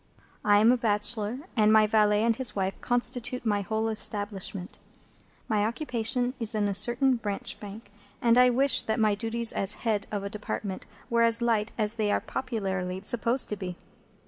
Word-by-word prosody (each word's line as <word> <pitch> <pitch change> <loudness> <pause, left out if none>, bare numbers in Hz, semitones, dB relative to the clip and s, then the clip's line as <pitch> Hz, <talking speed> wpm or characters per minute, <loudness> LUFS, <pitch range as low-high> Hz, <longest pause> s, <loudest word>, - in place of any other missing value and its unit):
I 205 -1 +4
am 220 +3 +5
a 250 - +2
bachelor, 220 +2 -2
and 215 -2 +4
my 215 0 +5
valet 210 0 +2
and 230 0 +2
his 260 +1 -1
wife 195 -1 -3
constitute 245 0 -2
my 205 -2 +1
whole 220 +3 -2
establishment. 205 -3 -1 0.7
My 210 -2 +1
occupation 245 0 -2
is 225 -2 -3
in 210 -1 +1
a 200 - -1
certain 240 +6 +3
Branch 205 -3 -3
Bank, 205 +1 -11 0.3
and 235 -1 +3
I 250 0 +6
wish 255 +1 +3
that 220 +2 -2
my 215 -1 +3
duties 225 +2 +1
as 195 +1 +2
head 215 -3 0
of 205 -2 -4
a - - -3
Department 210 -2 -6 0.2
were 235 0 +2
as 230 0 +4
light 230 -2 0
as 215 +1 -1
they 210 -2 0
are - - +1
popularly 190 -7 -4
supposed 240 +3 +3
to 210 - -2
be. 185 -3 -7
220 Hz, 180 wpm, -27 LUFS, 205-235 Hz, 0.7 s, I